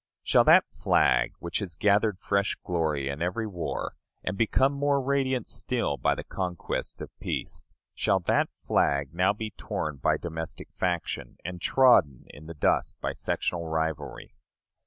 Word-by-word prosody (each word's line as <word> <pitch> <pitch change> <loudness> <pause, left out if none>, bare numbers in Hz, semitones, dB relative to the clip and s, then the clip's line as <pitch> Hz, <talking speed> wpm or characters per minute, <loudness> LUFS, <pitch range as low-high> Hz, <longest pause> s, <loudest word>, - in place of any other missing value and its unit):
Shall - - +5
that - - +7
flag, - - +2
which 85 0 -3
has 95 -6 -5
gathered 105 +1 +2
fresh 100 +1 0
glory 80 -6 -1
in 70 +3 -4
every 90 +6 -1
war, 90 -7 -4 0.3
and 90 - -2
become 130 +5 +2
more 140 0 +1
radiant 130 -3 0
still - - 0
by - - +1
the - - -6
conquest 90 -3 -4
of - - -7
peace - - -4 0.3
shall 95 - +2
that 85 - +2
flag 70 0 0
now 90 +3 +3
be 110 +1 -5
torn 75 -2 -3
by 65 - +2
domestic 80 -1 -6
faction, 85 -8 -2
and 90 0 -5
trodden 105 - +4
in 75 +3 -13
the 85 - -8
dust 75 - +1
by - - -2
sectional 85 -2 -2
rivalry? 80 -1 -3
90 Hz, 155 wpm, -27 LUFS, 80-105 Hz, 0.3 s, that